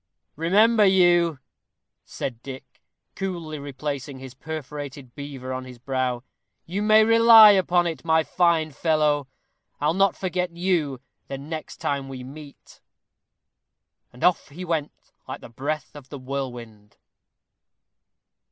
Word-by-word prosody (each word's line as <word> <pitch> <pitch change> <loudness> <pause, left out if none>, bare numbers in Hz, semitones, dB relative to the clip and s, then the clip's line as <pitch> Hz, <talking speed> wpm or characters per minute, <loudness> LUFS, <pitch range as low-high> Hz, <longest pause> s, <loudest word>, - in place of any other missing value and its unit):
"Remember 210 +8 +4
you," 175 -4 +4 0.7
said 120 -3 -6
Dick, 135 0 -11 0.3
coolly 170 -5 -5
replacing 140 -1 -5
his 130 -1 -10
perforated 145 -3 -7
beaver 135 -3 -7
on 130 0 -4
his 130 -1 -11
brow; 125 -1 -2 0.4
"you 190 +5 -3
may 215 +1 +6
rely 230 -1 +8
upon 180 -3 +2
it, 165 -2 -4
my 160 -1 +3
fine 160 0 +1
fellow, 150 -2 +1 0.5
I'll 150 +2 +1
not 195 +2 +2
forget 180 -2 -3
you 165 -8 0 0.3
the 135 - -5
next 155 +3 -7
time 140 -1 -3
we 130 -1 -7
meet." 140 +2 -13 1.3
And 125 - -11
off 180 -2 +2
he 175 +6 -8
went 160 -4 -1 0.4
like - - -7
the - - -11
breath 145 +6 -4
of 140 -3 -12
the 145 - -7
whirlwind. 120 -6 -7
150 Hz, 125 wpm, -24 LUFS, 135-175 Hz, 1.3 s, rely